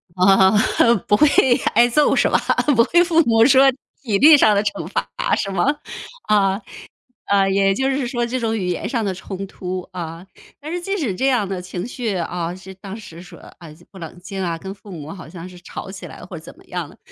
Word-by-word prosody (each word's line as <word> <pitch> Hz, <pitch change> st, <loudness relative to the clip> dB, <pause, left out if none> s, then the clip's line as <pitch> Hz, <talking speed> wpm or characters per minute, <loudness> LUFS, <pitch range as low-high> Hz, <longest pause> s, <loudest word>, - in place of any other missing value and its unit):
啊， 190 Hz, +1 st, +5 dB, 0.6 s
不 205 Hz, -, +4 dB
会 300 Hz, +8 st, +5 dB, 0.5 s
挨 235 Hz, +2 st, +5 dB
揍 290 Hz, +5 st, +2 dB
是 -, -, +3 dB
吧？ -, -, +3 dB, 0.4 s
不 230 Hz, -, +5 dB
会 345 Hz, +8 st, +3 dB
父 335 Hz, -1 st, +3 dB
母 225 Hz, 0 st, +4 dB
说 270 Hz, 0 st, +6 dB, 0.3 s
体 215 Hz, -7 st, 0 dB
力 295 Hz, +4 st, +8 dB
上 215 Hz, -5 st, +5 dB
的 200 Hz, -, +2 dB
惩 205 Hz, -, -3 dB
罚 90 Hz, 0 st, -3 dB, 0.3 s
是 195 Hz, -, -2 dB
吗？ 195 Hz, -, 0 dB, 0.6 s
啊， 200 Hz, -1 st, +1 dB, 0.7 s
啊， 195 Hz, -1 st, +2 dB
也 195 Hz, 0 st, +2 dB
就 265 Hz, +5 st, 0 dB
是 265 Hz, -2 st, -1 dB
说 240 Hz, -1 st, -1 dB
这 255 Hz, +2 st, -3 dB
种 225 Hz, -1 st, -1 dB
语 190 Hz, -4 st, -3 dB
言 180 Hz, -, -3 dB
上 235 Hz, -5 st, -1 dB
的 195 Hz, -2 st, -2 dB
冲 190 Hz, +1 st, -7 dB
突 185 Hz, -1 st, -6 dB
啊。 170 Hz, 0 st, -7 dB, 0.3 s
但 310 Hz, +3 st, -7 dB
是 355 Hz, -, -3 dB
即 390 Hz, +3 st, -3 dB
使 260 Hz, -, -2 dB
这 265 Hz, +8 st, 0 dB
样 240 Hz, -7 st, +1 dB
的 185 Hz, -2 st, -4 dB
情 180 Hz, +2 st, -6 dB
绪， 230 Hz, -5 st, -3 dB
啊， 170 Hz, 0 st, -3 dB
是 190 Hz, +1 st, -11 dB
当 195 Hz, +2 st, -9 dB
时 175 Hz, -6 st, -11 dB
说， 180 Hz, -, -14 dB, 0.2 s
啊， 170 Hz, -, -12 dB, 0.2 s
不 195 Hz, -, -12 dB
冷 165 Hz, 0 st, -9 dB
静 190 Hz, +1 st, -6 dB
啊， 170 Hz, -2 st, -2 dB
跟 190 Hz, +3 st, -8 dB
父 205 Hz, 0 st, -15 dB
母 160 Hz, -3 st, -8 dB
好 180 Hz, -5 st, -10 dB
像 170 Hz, +1 st, -9 dB
是 180 Hz, -1 st, -14 dB
吵 185 Hz, -, -8 dB
起 195 Hz, -, -9 dB
来 -, -, -12 dB
或 175 Hz, -1 st, -9 dB
怎 160 Hz, -, -13 dB
么 -, -, -20 dB
样 175 Hz, -4 st, -5 dB
的， -, -, -19 dB
195 Hz, 240 characters per minute, -20 LUFS, 180-235 Hz, 0.7 s, 力